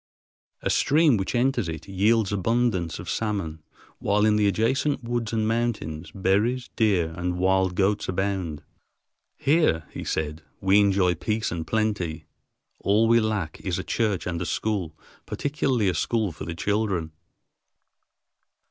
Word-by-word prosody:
A - - +1
stream 150 -2 +4
which 95 +3 -2
enters 120 -6 +1
it 80 - -6
yields 105 +2 +2
abundance 100 -4 0
of - - -9
salmon, 95 -8 -2 0.4
while 105 +1 +2
in 105 -1 +4
the 105 -1 +3
adjacent 130 +7 +1
woods 115 -2 -2
and 110 -1 0
mountains 105 -9 -2
berries, 105 +7 0
deer, 95 -8 +2
and 90 +1 -2
wild 95 0 +2
goats 100 +2 +1
abound. 95 -5 -2 0.7
"Here," 140 - +2
he - - -6
said, 80 +1 -2 0.2
"we 95 +2 +4
enjoy 95 -3 +3
peace 110 +6 -2
and 80 -2 -4
plenty; 105 -7 -1 0.5
all 105 +3 +3
we 115 +1 +5
lack 105 -8 -2
is 90 -3 -2
a - - -3
church 105 -5 -1
and 85 -1 -3
a - - -1
school, 95 -8 -2 0.3
particularly 135 -6 0
a 90 - +2
school 110 -2 0
for 75 - -8
the 85 - -5
children." 100 -4 -1
100 Hz, 145 wpm, -25 LUFS, 90-115 Hz, 0.7 s, we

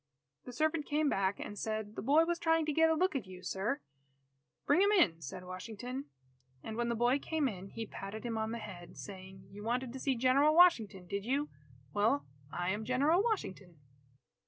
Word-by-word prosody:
The 250 - -7
servant 310 +4 0
came 295 0 +2
back 195 -2 0
and 205 - -6
said, 215 -1 -3
"The - - -4
boy 295 +8 +4
was 345 0 -1
trying 325 -1 +2
to 305 - -1
get 320 +2 +5
a 320 - +3
look 365 0 +1
at 240 -8 -2
you, 185 -1 -11
sir." 215 +9 -2 0.8
"Bring 295 +6 +4
him 400 - +5
in," 180 - +4
said 150 +5 -7
Washington. 225 +8 -6 0.6
And 220 - -5
when 235 +1 -1
the 235 - 0
boy 240 +4 +3
came 310 -1 0
in, 195 -5 -5
he 225 +2 -5
patted 205 +1 -7
him 235 -2 -3
on 220 0 -1
the 235 - -3
head, 185 -6 -9
saying: 190 -1 -9
"You 205 +1 -9
wanted 245 +2 -1
to 265 - -6
see 270 0 +1
General 270 +5 +4
Washington, 225 - +5
did 200 +3 -3
you? 275 +6 0 0.4
Well, 205 -9 +2 0.3
I 175 +1 -1
am 210 +2 -2
General 280 - +3
Washington." 195 - -3
235 Hz, 200 wpm, -33 LUFS, 200-295 Hz, 0.8 s, get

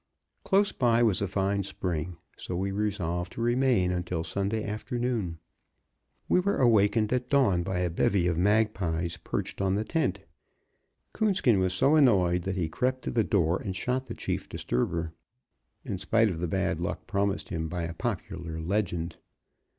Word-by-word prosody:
Close 200 +1 +3
by 120 -2 +3
was 105 -5 +3
a 100 - 0
fine 100 +1 0
spring, 90 -3 -3 0.2
so 90 - -5
we 95 +2 -1
resolved 90 -4 -2
to - - -8
remain 120 -5 +2
until 90 -2 -2
Sunday 100 +5 -2
afternoon. 110 -4 -2 0.9
We - - +4
were 200 +2 0
awakened 110 -2 +3
at 125 0 -1
dawn 110 -11 +3
by 90 0 -2
a 90 - +1
bevy 90 +1 +2
of 90 -1 +1
magpies 90 -4 +1
perched - - -4
on 95 0 +1
the 105 - 0
tent; 105 - -1 0.9
Coonskin 190 - +2
was 95 0 +1
so 135 +11 +3
annoyed 95 - +4
that 95 -1 -1
he 90 -4 0
crept 130 +10 -1
to - - -3
the 115 - +2
door 90 -5 +1
and 95 -2 -4
shot 130 +5 -1
the - - -6
chief - - -3
disturber, 80 +6 -2 0.7
in 95 - -3
spite 110 +4 +3
of 85 -4 -4
the 90 - -1
bad - - -1
luck - - -3
promised 100 0 -1
him 80 -1 -3
by 85 0 -3
a 85 0 -4
popular 90 -4 -4
legend. 85 -1 -2
100 Hz, 165 wpm, -28 LUFS, 90-115 Hz, 0.9 s, We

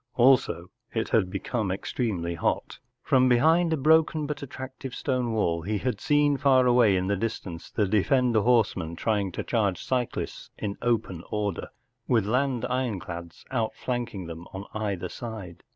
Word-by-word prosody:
Also, 120 -8 +3 0.2
it 115 - -1
had 100 -5 +2
become 110 +1 -2
extremely 95 -3 -2
hot. 85 - -2 0.2
From 130 -1 +4
behind 160 +8 +4
a 160 - +2
broken, 155 +1 +3
but 145 0 -4
attractive, 130 -1 -7
stone 125 -4 -1
wall 85 -7 +1
he 105 +5 -1
had 125 +4 -2
seen 145 -1 +3
far 130 -2 +4
away 120 -5 +5
in 90 0 0
the 100 +1 +1
distance 95 -5 -4
the 105 - +1
defender 115 +3 +3
horsemen 100 -8 +2
trying 100 0 0
to - - -3
charge 100 -7 0
cyclists 125 -2 -2
in 100 -1 -3
open 110 -8 0
order, 105 -4 -2 0.4
with 115 -5 +3
land 125 +2 +1
ironclads 90 -10 -4
outflanking 120 -4 -2
them 85 +1 -8
on 95 +1 -6
either 100 -4 -2
side. 105 -6 -8
115 Hz, 150 wpm, -27 LUFS, 95-130 Hz, 0.4 s, away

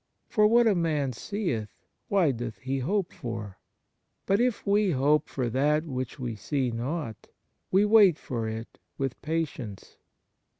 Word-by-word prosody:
For 210 -2 +4
what 235 +2 +5
a 220 - +5
man 155 -7 0
seeth, 125 - -3 0.4
why 185 -7 +3
doth 115 -2 -5
he 135 +1 -3
hope 185 +7 -1
for? 110 -5 -6 0.7
But 195 +1 +2
if 245 -3 0
we 205 0 +3
hope 145 +3 +2
for 130 -3 -2
that 150 +5 +2
which 130 -4 -4
we 120 -4 -4
see 130 +4 -1
not, 120 0 -4 0.4
we 195 +2 +4
wait 205 -6 +6
for 115 -3 -3
it 110 +1 -7 0.2
with 135 -2 -3
patience." 150 -10 -4
140 Hz, 145 wpm, -28 LUFS, 120-190 Hz, 0.7 s, wait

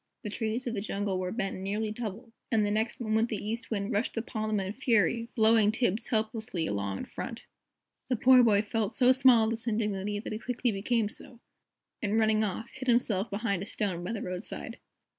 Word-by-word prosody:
The 210 - -4
trees 225 +3 -2
of 240 - -2
the 200 - -2
jungle 200 -2 -2
were 185 0 -2
bent 195 -3 -2
nearly 210 +3 -2
double, 225 +1 -6 0.2
and 220 -2 +3
the 205 - 0
next 220 +2 -1
moment 220 0 +1
the 220 - -1
East 225 +3 -4
Wind 205 0 -2
rushed 210 +3 -1
upon 215 -1 -3
them 215 -1 +1
in 190 -1 -3
a - - -4
fury, 230 -2 +1
blowing 220 -2 +5
Tibbs 225 -1 0
helplessly 220 -6 -1
along 100 -5 -2
in - - -5
front. - - -7 0.7
The 255 - +2
poor 255 +2 +7
boy 210 -3 +4
felt 220 0 -2
so 255 -1 +5
small 255 -3 +6
at 220 - +1
this 230 +1 -4
indignity, 210 -2 -1
that 210 - -5
he 215 - -4
quickly 245 0 -1
became 220 +2 0
so, 230 +2 -10 0.6
and 210 -1 0
running 220 -1 +3
off, 215 +3 -3
hid 265 0 -8
himself 230 -4 +2
behind 200 -3 -1
a 200 - -5
stone 185 -5 -2
by 180 - -3
the 215 - -4
roadside. 180 +2 -6
220 Hz, 210 wpm, -29 LUFS, 205-230 Hz, 0.7 s, poor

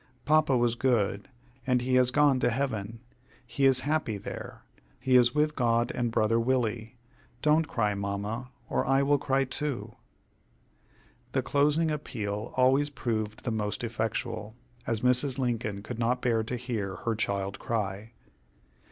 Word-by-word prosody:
Papa 150 -3 +4
was 120 -1 +2
good, 115 -5 0 0.4
and 125 -1 +2
he 130 +1 -1
has 125 -1 +5
gone 140 0 +3
to 120 - +2
heaven. 115 -4 -3 0.4
He 140 -1 +2
is 130 -1 +4
happy 145 -8 -1
there. - - -8 0.4
He 130 -1 +2
is 120 +1 +5
with 150 0 +2
God 120 -1 +1
and 120 -1 -1
brother 115 0 +2
Willie. 115 -1 -1 0.5
Don't 155 +1 +3
cry, 105 -6 0
Mamma, 100 +5 -4 0.2
or - - 0
I 135 +1 +2
will 145 0 +3
cry 135 0 +1
too." 135 0 -3 1.4
The - - +1
closing 150 +3 +2
appeal 110 -7 -4
always 135 +3 +4
proved 110 -6 -3
the 120 - -2
most 105 0 -2
effectual, 110 -1 -3 0.3
as 115 -2 0
Mrs. 125 +2 +3
Lincoln 115 -6 -2
could 120 +1 -6
not 120 +2 +1
bear 115 -2 +2
to 125 - -3
hear 115 -6 -3
her 115 - +1
child 100 -2 -2
cry. 105 0 -3
120 Hz, 150 wpm, -28 LUFS, 110-135 Hz, 1.4 s, has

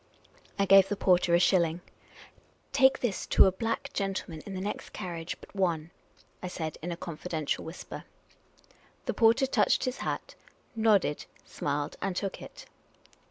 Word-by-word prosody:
I 200 - +2
gave 195 0 +7
the 205 - 0
porter 180 -3 +3
a - - +5
shilling. 175 -2 +3 0.9
"Take 265 -1 +5
this 230 -6 -2
to - - +6
a 190 - +4
black 225 +7 -3
gentleman 190 -5 -3
in 195 - -5
the - - -3
next 205 +2 -5
carriage 170 -2 -5
but - - -16
one," 170 -4 0 0.5
I 185 - -4
said, 160 -3 -5
in 175 +3 -4
a 170 - -4
confiden 165 -2 -5
tial - - 0
whisper. 160 +2 -8 1.0
The - - -1
porter 230 +3 +4
touched 265 - +2
his 255 0 -2
hat, - - -4 0.4
nodded, 210 -9 +2 0.2
smiled, 145 0 -3
and 190 - -1
took 195 +1 -3
it. - - -11
185 Hz, 160 wpm, -29 LUFS, 170-205 Hz, 1.0 s, gave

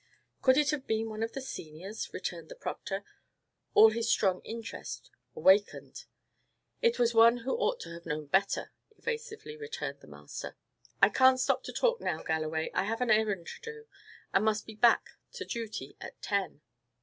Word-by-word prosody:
"Could 260 0 +5
it 295 -2 +4
have 285 -3 -3
been 220 0 0
one 215 0 -5
of 225 0 -2
the 270 - -4
seniors?" 185 -3 -7
returned 170 -3 -5
the - - -8
proctor, 195 +1 -4 0.7
all 220 +1 +9
his 230 +1 -1
strong 185 -3 +2
interest 230 0 -7 0.2
awakened. 200 +2 +2 0.8
"It 470 -1 +3
was 240 -1 +3
one 230 +1 +7
who 265 - 0
ought - - 0
to 170 - -8
have 170 0 -10
known 155 -1 -3
better," 190 +7 +1 0.3
evasively 450 +1 -5
returned 450 +1 -5
the - - -17
master. - - -8 0.5
"I - - +9
can't 260 0 +5
stop 255 - +2
to - - -5
talk 485 -1 +1
now, 160 - -2
Galloway. 160 0 -1
I - - +1
have 225 +3 -2
an 245 -3 +2
errand 210 -5 +2
to - - -9
do, 450 0 -12 0.5
and 195 - +4
must 220 0 +1
be 220 - -9
back 230 +2 +4 0.3
to - - -6
duty 225 -3 -5
at - - -9
ten." 200 -7 -2
220 Hz, 175 wpm, -31 LUFS, 190-260 Hz, 0.8 s, all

